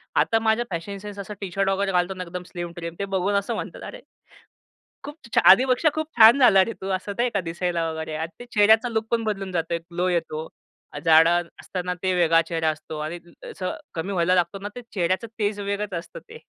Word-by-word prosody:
आता 225 - +3
माझा 220 +1 +1
fashion 180 +4 -4
sense 205 0 -9
असं 200 +1 -6
टी-शर्ट 195 0 -1
वगैरे 195 0 0
घालतो 180 +1 +1
ना, 185 -1 -6
एकदम 180 +1 -7
स्लिम-ट्रिम 170 -1 -6
ते 200 - -1
बघून 190 +2 0
असं 200 0 0
म्हणतात, - - -6
"अरे" - - -9 1.0
"खूप 290 +2 -8 0.2
छा - - +6
आधीपेक्षा 255 - +5
खूप 315 0 -2
छान 225 +4 +9
झाला 210 -8 +6
रे 230 - -5
तू!" 190 - -5
असं 195 +2 -6
नाही 245 +1 +2
का 200 - 0
दिसायला 170 -1 -2
वगैरे. 160 0 -5
आणि 160 +1 -4
ते - - -7
चेहऱ्याचा 220 +3 +5
लूक 220 -1 -2
पण 230 -1 +1
बदलून 195 -3 -3
जातो, 170 -1 -1
ग्लो 175 +2 -3
येतो. 160 -3 -2 0.6
जाडं 165 +1 +5
असताना 180 -1 -4
ते 185 -1 +1
वेगळा 165 -2 +4
चेहरा 165 -2 0
असतो. 155 0 -7
आणि 155 +3 -4 0.3
अ, - - -9
असं 185 -3 -4 0.2
कमी 170 +4 -3
व्हायला 180 -1 +2
लागतो 180 +2 0
ना, 205 - -3
ते 245 - -6
चेहऱ्याचं 185 +3 0
तेज 205 -1 -1
वेगळच 200 0 -3
असतं 170 - -10
ते. 455 +1 -11
185 Hz, 205 wpm, -24 LUFS, 170-210 Hz, 1.0 s, छान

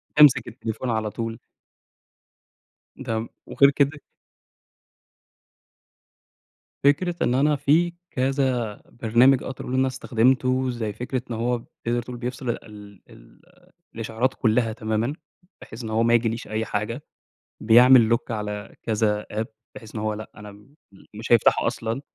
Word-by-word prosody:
تمسك 150 -3 +6
التليفون 120 +1 -5
على 110 -2 -1
طول. 115 -1 -5 1.7
تمام 110 0 -3 0.2
وغير 140 0 +4
كده 145 +1 +1 2.8
فكرة 165 +5 +2
إن 125 - +2
أنا 145 +2 +3
في 160 +5 +2 0.2
كذا 130 -5 -1
برنامج 120 +3 +3
أقدر 130 - -7
اقول 125 - -5
إن 130 - +2
أنا 130 - +3
استخدمته 130 +1 +1
زي 110 -4 -3
فكرة 125 +3 -3
إن - - -2
هو 120 +2 0
بتقدَر 120 +1 -4
تقول 120 +1 -8
بيفصِل 125 +1 -5
ال 105 -3 -7
ال 115 +6 -18 0.5
الإشعارات 115 +3 -1
كلّها 115 -1 +1
تمامًا، 110 +3 -2 0.5
بحيث 115 +2 -10
إن 110 - -5
هو 110 +1 +1
ما 115 0 +3
ييجيليش 115 0 0
أي 110 +1 -2
حاجة 115 +6 -3 0.6
بيعمل 120 +1 +6
lock 120 - -4
على 105 -2 -5
كذا 105 -1 0
app 110 +1 -2 0.3
بحيث 110 -1 -12
إن 105 - -3
هو 110 0 -1
لأ 110 0 -8
أنا 105 -1 -10 0.6
مش 115 +2 -4
هيفتَحه 115 - +4
أصلًا، 115 +4 -2
115 Hz, 135 wpm, -24 LUFS, 110-130 Hz, 2.8 s, تمسك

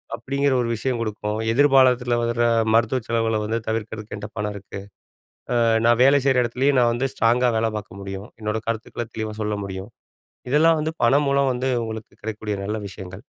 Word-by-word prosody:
அப்டிங்கிற 140 0 0
ஒரு 115 - -2
விஷயம் 125 +1 -2
குடுக்கும் 105 -1 -3 0.2
எதிர்பாலத்தில 130 -3 +4
வர 120 0 +1 0.3
மருத்துவ 115 +3 +2
செலவு 115 -2 0
வந்து 115 +2 -1
தவிர்க்கிறதுக்கு 110 -1 -4
என்ட்ட 105 0 -7
பணம் 105 0 -2
இருக்கு. 100 0 -9 0.8
ஆ - - +4 0.2
நான் 120 0 +4
வேலை 140 +1 +6
செய்ற 130 -2 +4
இடத்துலேயும் 130 +4 +1
நான் 120 -1 +3
வந்து 130 +3 0
ஸ்ட்ராங்கா 120 +2 +3
வேல 110 0 +1
பார்க்க 100 -1 -9
முடியும். 95 +1 -7
என்னோட 105 +1 -1
கருத்துக்கள 115 +1 -4
தெளிவா 110 -1 -4
சொல்ல 105 0 -1
முடியும். 95 +1 -7 0.6
இதெல்லாம் 160 +3 +4
வந்து 160 +1 -2
பணம் 140 +5 +4
மூலம் 140 -1 +2
வந்து 130 +2 -1
உங்களுக்கு 110 -1 -7
கிடைக்கக் 110 0 -6
கூடிய 105 -1 -1
நல்ல 110 +1 -2
விஷயங்கள். 95 -1 -10
115 Hz, 175 wpm, -23 LUFS, 105-130 Hz, 0.8 s, வேலை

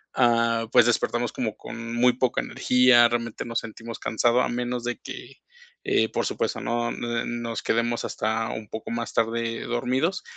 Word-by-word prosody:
ah, 115 -2 +3
pues, - - +6
despertamos 120 0 0
como 110 -4 -3
con 115 0 -7
muy 125 +1 +4
poca 130 0 0
energía, 125 -1 +5
realmente 115 -1 -3
nos 115 -1 -1
sentimos 115 +1 -8
cansados, 120 +2 +2
a - - -1
menos 120 0 -2
de 120 - -2
que, - - -10 0.4
eh, - - +2
por - - -1
supuesto, - - -2
no 120 0 -1
nos 120 0 -3
quedemos 115 +1 0
hasta 110 +1 -1
un 110 -1 -7
poco 110 - -6
más 115 0 -3
tarde 115 0 -1
dormidos, 130 +9 0
120 Hz, 160 wpm, -25 LUFS, 115-120 Hz, 0.4 s, pues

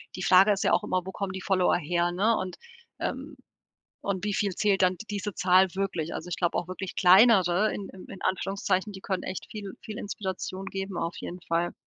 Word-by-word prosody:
die 185 - -5
Frage 190 +3 +6
ist 200 - 0
ja - - +3
auch - - +3
immer, 185 0 0
wo 190 - -5
kommen 195 -1 -4
die 190 - -5
Follower 185 -3 +2
her, 175 +1 0
ne, 215 +6 +2
und, 185 -1 -4 0.4
ähm - - -4 0.7
und 200 0 -2
wie 205 - -1
viel 200 -1 0
zählt 205 -2 +2
dann 185 0 +3
d 225 - -9
diese 205 -1 -3
Zahl 185 +1 +5
wirklich? 180 -5 -2
Also, - - -6
ich - - -2
glaube 175 -2 0
auch 175 - -2
wirklich 185 0 -6
kleinere 195 0 +6
in 200 - -6
in 190 - -12
in 195 - -10
Anführungszeichen, 195 +1 -1
die 190 - -8
können 190 -2 -2
echt 185 - -5
viel 205 -3 -7
viel 215 -2 -7
Inspiration 190 -1 -5
geben 195 -1 -5
auf 170 0 -3
jeden 180 +1 -7
Fall. 170 +1 0
190 Hz, 215 wpm, -27 LUFS, 180-200 Hz, 0.7 s, Frage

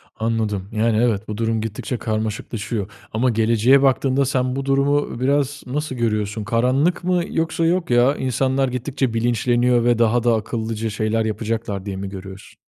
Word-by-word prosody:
Anladım, 110 -4 -2
yani 110 0 +1
evet 110 -3 +1
bu 105 -1 -5
durum 115 -1 0
gittikçe 110 +3 -4
karmaşıklaşıyor 110 -1 -3 0.2
ama 120 +4 +2
geleceğe 115 +4 +4
baktığında, 135 0 +2
sen 130 -1 0
bu 135 0 -3
durumu 140 -1 +1
biraz 140 +2 0
nasıl 145 +1 -3
görüyorsun? 110 -2 -1
Karanlık 130 - +1
mı 180 -1 +1
yoksa 165 0 0
yok 175 +1 +1
ya, 120 +3 +4
insanlar 130 +1 0
gittikçe 130 0 -2
bilinçleniyor 120 +1 +2
ve 120 -1 +2
daha 120 +1 +3
da 120 -2 +3
akıllıca 110 0 -3
şeyler 110 +1 0
yapacaklar 110 -2 -3
diye 100 -1 -4
mi 95 0 -5
görüyorsun? 95 0 -10
115 Hz, 155 wpm, -21 LUFS, 110-130 Hz, 0.2 s, geleceğe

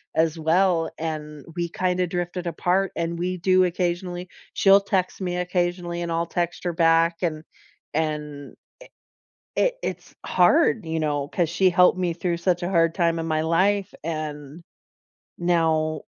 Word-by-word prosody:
as 160 0 +2
well, 165 +1 +2
and 150 -2 -5
we 175 -1 -2
kinda 180 +1 0
drifted 175 +1 -4
apart, 180 +3 0
and 170 0 -2
we 180 +1 -2
do 185 +1 +3
occasionally 180 0 -2 0.3
she'll 195 0 +6
text 190 -1 -1
me 180 -1 -2
occasionally 175 -1 -2
and 170 - -4
I'll 165 +1 0
text 175 +1 -3
her 175 - 0
back 165 0 +3
and 155 -2 -2 0.5
and, 150 -2 -3 1.0
eh - - +3
i - - +1
it's - - -5
hard, 215 - +3
you 160 0 -2
know, 145 -2 -1
'cause 170 -1 -1
she 185 +2 +3
helped 180 +1 +4
me 175 -2 0
through 175 0 -2
such 175 0 0
a 175 - -1
hard 165 -2 +3
time 170 -2 +1
in 165 - -3
my 155 -1 0
life, 190 +4 +1
and 155 -1 -5 0.8
now 160 -3 +1
170 Hz, 155 wpm, -24 LUFS, 160-180 Hz, 1.0 s, she'll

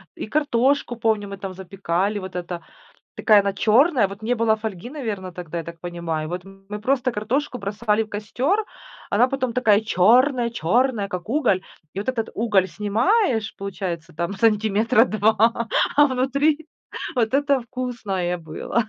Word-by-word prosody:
И - - -6
картошку, 275 -2 +1
помню, 220 -3 0
мы 200 0 -7
там 195 -1 -6
запекали, 190 +2 -2
вот 185 -1 -8
эта. 175 -1 -4 0.5
Такая 210 -2 +5
она 200 0 0
черная. 240 - +4
Вот 195 +2 -10
не 230 +3 0
было 225 -2 +2
фольги, 215 0 -6
наверное, 215 -10 -5
тогда, 170 -1 -6
я 165 - -3
так 170 -1 -9
понимаю. 170 -3 -4
Вот 180 +1 -5
мы 195 +2 -9
просто 255 +2 +1
картошку 250 +5 -2
бросали 210 +1 0
в - - -13
костер. 260 - -1 0.5
Она 250 - +4
потом 255 -2 -2
такая 220 -4 +3
чёрная-чёрная, 235 - +2
как 180 +1 -5
уголь. 240 -8 +1 0.3
И 195 - -4
вот 210 - -5
этот 230 -4 -1
уголь 205 -4 +2
снимаешь, 225 - +1
получается, 180 -4 -5
там, 170 +5 -3
сантиметра 220 +2 +3
2, 225 +1 +2 0.3
а 290 - +8
внутри 280 +4 +1 0.5
вот 230 -1 +1
это 280 -1 +3
вкусное 225 -8 -3
было. 165 +8 -2
215 Hz, 155 wpm, -23 LUFS, 195-250 Hz, 0.5 s, а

